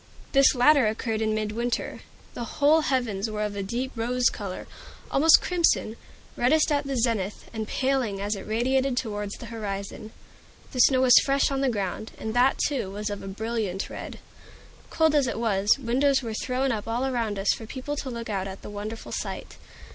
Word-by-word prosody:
This 275 -1 +5
latter 260 0 +5
occurred 220 0 -2
in 215 0 +1
midwinter. 215 +3 -2 0.3
The 235 -2 -7
whole 300 +3 +5
heavens 235 -8 -1
were 210 0 -2
of 210 -1 -3
a 200 - -2
deep 240 +7 -3
rose 245 +2 +1
color 195 -4 -6 0.5
almost 315 +4 +6
crimson 340 -10 +1 0.4
reddest 305 +6 +3
at 285 -1 0
the 270 -1 -2
zenith, 225 -4 -1
and 220 -1 -4
paling 260 -7 0
as 205 +2 -1
it 195 - -8
radiated 255 +4 +1
towards 205 -4 -3
the - - -10
horizon. 200 -1 -5 0.6
The 255 - -5
snow 260 +1 +5
was 250 -2 +8
fresh 275 0 +2
on 270 0 -1
the 270 - +2
ground, 205 -1 -3
and 220 - -4
that, 250 +3 +3
too, 270 -9 -1
was 205 +1 -4
of 205 - -5
a - - -8
brilliant 210 -1 -3
red. - - -7 0.7
Cold 320 -1 +2
as 285 -3 +3
it 235 - -3
was, 210 -1 +2
windows 270 +2 +1
were 225 -2 -4
thrown 255 +4 -1
up 215 -2 -3
all 235 +3 -1
around 230 -6 -1
us 195 +1 +2
for 225 - -8
people 265 +4 -5
to 275 - -4
look 235 -1 -5
out 195 -3 -2
at 195 0 -9
the - - -8
wonderful 210 +2 -6
sight. - - -5
230 Hz, 190 wpm, -26 LUFS, 210-265 Hz, 0.7 s, was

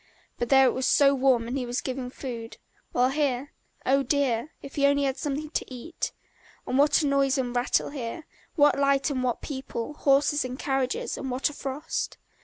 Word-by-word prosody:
But 240 - -1
there 270 -1 +7
it - - +3
was 260 0 -1
so 280 0 +5
warm 255 -4 +2
and 245 - -3
he 270 - -1
was 245 +1 -2
given 255 -1 -4
food, 235 -3 -7 0.3
while 250 +1 +3
here 280 -1 -1 0.3
oh, 275 +2 +4
dear, 270 -1 0
if 275 - -9
he 280 -1 +3
only 285 0 +2
had 270 -1 0
something 295 +2 -3
to - - -3
eat! 260 +7 -5 0.5
And 260 - 0
what 295 +2 +4
a - - +1
noise 275 -1 +2
and 250 -2 -2
rattle 245 +3 +1
here, 275 +3 -5 0.3
what 290 -3 +4
light 280 +1 +2
and 260 -2 -1
what 245 -2 -1
people, 265 -2 -5
horses 290 0 +3
and 255 0 -5
carriages, 270 -2 -1
and 265 - -4
what 260 +3 0
a - - -12
frost! 275 +2 -4
270 Hz, 200 wpm, -27 LUFS, 255-285 Hz, 0.5 s, there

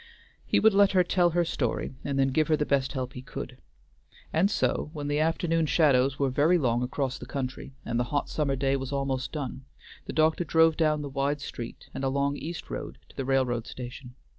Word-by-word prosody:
He - - +3
would 220 -1 +5
let 200 0 +5
her 185 -1 +5
tell 175 0 +3
her 170 +1 +1
story, 130 -5 -2
and 140 -1 -2
then 135 0 +3
give 155 +4 +2
her 155 -2 +3
the 150 - 0
best 140 -1 +1
help 130 -2 -3
he 125 - -7
could; - - -7 0.7
and 175 +5 +3
so 175 - 0
when 145 -3 -4
the 145 +1 0
afternoon 165 0 +1
shadows 140 -4 +3
were 135 -2 +1
very 150 +7 +4
long 120 -6 +1
across 130 +1 -2
the - - -9
country, 130 0 -5
and 115 +1 -1
the 120 - +1
hot 145 +3 -1
summer 140 -3 0
day 135 +1 +1
was 135 0 -3
almost 135 -2 -2
done, 135 -3 -5 0.4
the - - -4
doctor 160 +2 +3
drove 160 0 +4
down 155 -2 +1
the - - -4
wide 140 +1 -1
street 120 -4 -7
and 135 - -5
along 140 +1 +1
East 165 +2 -6
Road - - -5
to - - -19
the 135 - -3
railroad 125 -3 +1
station. 125 0 -8
140 Hz, 215 wpm, -28 LUFS, 130-155 Hz, 0.7 s, would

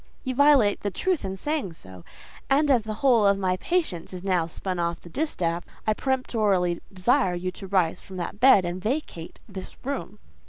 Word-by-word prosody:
"You 260 - -2
violate 275 -6 +5
the 205 - -2
truth 365 - -1
in 190 0 -4
saying 290 - -2
so; 95 - -12 0.5
and 285 +1 +3
as 250 -4 +4
the 215 0 -5
whole 235 -6 +5
of 200 0 +4
my 185 -1 0
patience 305 - -1
is 180 0 -7
now 180 -4 +1
spun 180 +2 -4
off 170 0 -1
the 175 - -13
distaff, 175 - -1 0.2
I 215 - +3
peremptorily 210 -9 0
desire 195 +1 +2
you 185 +1 -3
to 195 +1 -10
rise 185 -4 +1
from 190 - -10
that 180 +3 -5
bed, 250 -7 +6
and 175 +1 -4
vacate 215 - -4
this 190 - -9
room." 260 -7 -4
195 Hz, 190 wpm, -25 LUFS, 180-260 Hz, 0.5 s, bed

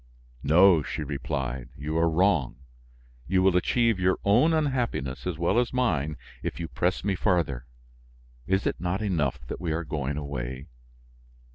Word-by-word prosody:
"No," 85 +3 +6
she 75 - -4
replied, 65 -3 -4
"you 75 +3 -4
are 85 0 +3
wrong; 80 -5 +2 0.7
you 95 +1 +2
will 95 -1 +4
achieve 115 +3 +2
your 90 +1 +2
own 120 +11 +5
unhappiness 125 - -1
as 90 -3 -2
well 85 +7 +2
as 120 - 0
mine 80 - 0 0.2
if 70 - -4
you 85 - -3
press 90 +3 -1
me 100 0 +1
farther. 85 - 0 0.8
Is 95 +1 +1
it - - 0
not 90 +4 -1
enough 75 - -1
that - - -6
we 85 -3 -2
are 85 +2 -2
going 70 -2 -3
away? 65 -2 -5
85 Hz, 155 wpm, -27 LUFS, 70-95 Hz, 0.8 s, No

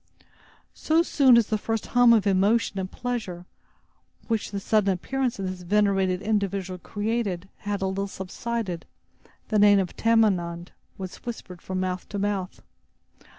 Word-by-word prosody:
So 320 +2 +2
soon 265 -7 +5
as 235 - +4
the 215 0 -1
first 225 0 -2
hum 245 -1 +6
of 220 -3 +4
emotion 200 +2 +2
and 185 -1 -3
pleasure, 220 -8 -4 0.8
which 225 -2 -1
the 200 - -4
sudden 205 0 +2
appearance 255 +7 -2
of 195 -1 -3
this 185 -1 -5
venerated 195 -1 +1
individual 195 -3 -1
created, 205 -3 -2
had 205 -1 -3
a - - +1
little 195 +1 -2
subsided, 195 -1 -4 0.6
the 215 - +2
name 205 0 +7
of 190 -2 -1
"Tamenund" 185 -7 +1 0.3
was 185 -2 -7
whispered 195 -7 -8
from 185 0 -3
mouth 185 -1 -3
to 205 - -4
mouth. 200 -2 -2
200 Hz, 150 wpm, -25 LUFS, 185-225 Hz, 0.8 s, name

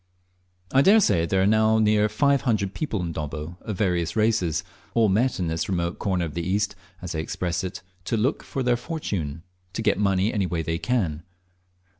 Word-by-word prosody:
I 135 - +6
daresay 140 - +4
there 95 +2 +2
are - - +3
now 110 +1 +4
near 105 -1 +3
five 140 +5 +2
hundred 100 -6 0
people 110 - -2
in 85 - -3
Dobbo 75 +2 -5
of 105 -4 -5
various 90 -3 0
races, 105 -8 +1 0.3
all 115 -3 +4
met 115 +4 +1
in 90 - 0
this 80 +2 -2
remote 85 -2 -1
corner 95 -4 0
of 80 - -6
the 85 - -2
East, 100 +3 0 0.3
as 90 - -4
they 80 -3 -2
express 85 +2 -2
it, 95 +1 -5 0.2
"to 115 - 0
look 125 +7 0
for 135 - -4
their 120 -1 +2
fortune;" 85 - -4 0.3
to 115 - -3
get 105 - +2
money 100 +1 +2
any 100 -3 0
way 85 -1 -2
they 80 +1 -2
can. 90 -9 0
100 Hz, 195 wpm, -25 LUFS, 85-110 Hz, 0.3 s, I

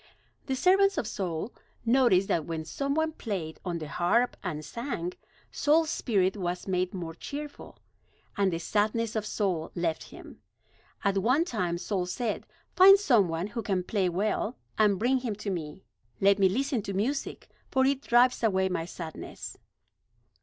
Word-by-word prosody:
The 265 - 0
servants 390 +7 +4
of - - 0
Saul 190 -1 -3 0.3
noticed 230 -6 +4
that 160 -3 0
when 160 -1 -4
some 275 - -2
one 315 0 +1
played 190 - -5
on 175 -2 -2
the 155 -2 -6
harp 205 +11 +1
and 155 -5 -4
sang, 180 - -4 0.4
Saul's 315 +2 +3
spirit 190 -5 +1
was 180 -2 -3
made 185 -1 0
more 170 -3 -5
cheerful; 290 - -8 0.6
and 200 -2 +2
the 165 - -1
sadness 215 +6 0
of 215 -1 -1
soul 185 -7 -1
left 170 -2 -1
him. - - -13 0.6
At 200 -1 +2
one 255 - +3
time 180 - -1
Saul 185 0 -2
said: 225 +4 -3 0.3
"Find 390 +1 +9
some 240 - +4
one 165 +2 -2
who 230 +3 -4
can 195 -4 -1
play 190 -1 0
well, 210 +6 -1 0.2
and 210 -2 +3
bring 255 +6 +2
him 240 -5 -3
to 205 0 -4
me. 165 0 -5 0.4
Let 200 +1 +4
me 190 -1 +5
listen 265 +4 0
to 195 - -5
music; 240 +9 -2 0.2
for 265 0 +3
it 275 0 +1
drives 245 -1 +4
away 190 -4 +2
my 170 -3 -2
sadness." 165 -2 -8
200 Hz, 165 wpm, -28 LUFS, 180-250 Hz, 0.6 s, Find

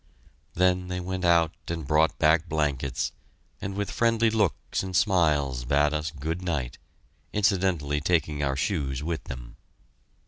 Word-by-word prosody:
Then 90 0 +2
they 90 0 -3
went 95 +1 -4
out 85 -2 +4
and 85 -2 -4
brought 75 +1 +2
back 80 +2 +3
blankets, 70 -4 -1 0.5
and 95 0 -4
with 100 0 -2
friendly 115 -1 +2
looks 105 -6 0
and 95 -1 -5
smiles 75 - +2
bade 75 +4 +2
us 75 0 -1
good 80 +4 -4
night, 75 -9 -3 0.5
incidentally 90 -8 +1
taking 75 -2 +1
our 70 -1 0
shoes 70 -3 -1
with 80 0 -3
them. - - -8
80 Hz, 140 wpm, -26 LUFS, 70-90 Hz, 0.5 s, out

